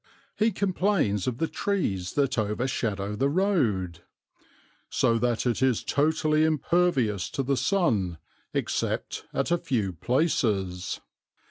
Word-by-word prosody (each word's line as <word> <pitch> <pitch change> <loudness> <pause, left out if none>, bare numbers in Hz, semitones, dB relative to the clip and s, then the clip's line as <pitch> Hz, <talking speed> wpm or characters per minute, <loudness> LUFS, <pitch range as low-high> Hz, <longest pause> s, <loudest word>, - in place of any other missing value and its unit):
He 220 +1 +2
complains 185 - 0
of 125 -2 -1
the 160 - 0
trees 100 - -1
that 140 -4 +1
overshadow 105 -2 -1
the 135 +6 +1
road, 120 - +1 0.9
"so 115 0 +2
that 120 0 0
it 120 0 0
is 130 -4 +2
totally 155 +1 +2
impervious 155 - +1
to 135 - -2
the 140 +1 +1
sun, 115 - +1 0.3
except - - -2
at 135 +5 -1
a 175 - +3
few 110 - -1
places." 100 - 0
130 Hz, 120 wpm, -27 LUFS, 105-160 Hz, 0.9 s, a